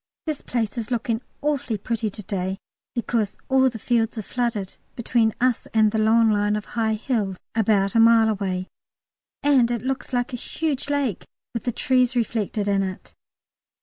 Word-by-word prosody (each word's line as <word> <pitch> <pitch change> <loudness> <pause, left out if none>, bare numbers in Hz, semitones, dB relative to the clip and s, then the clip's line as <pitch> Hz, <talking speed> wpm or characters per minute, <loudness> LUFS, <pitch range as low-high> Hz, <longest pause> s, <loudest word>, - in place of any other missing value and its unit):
This 310 -3 -3
place 235 -1 -2
is 225 0 -4
looking 230 -1 -1 0.2
awfully 285 -6 0
pretty 225 +1 -2
to 210 +1 -8
day, 190 -1 -2 0.4
because 230 -3 -1
all 265 0 +5
the 235 - -7
fields 230 0 0
are 220 - -3
flooded 230 -5 -2 0.2
between 235 -1 +2
us 250 -1 +1
and 215 -1 +5
the 220 - 0
long 225 +1 +4
line 205 0 +2
of 210 0 -3
high 220 -2 +1
hills 210 -5 -1 0.2
about 205 -3 +2
a 230 - +4
mile 225 -1 +6
away, 190 -3 -2 0.8
and 270 -5 +4
it 240 -1 -2
looks 265 0 -3
like 245 0 -1
a - - -2
huge 290 +2 -3
lake 280 -9 -1 0.3
with 230 - -4
the 245 - +1
trees 255 0 +2
reflected 220 -3 -1
in 200 -1 +2
it. 190 -1 -5
230 Hz, 175 wpm, -24 LUFS, 210-245 Hz, 0.8 s, mile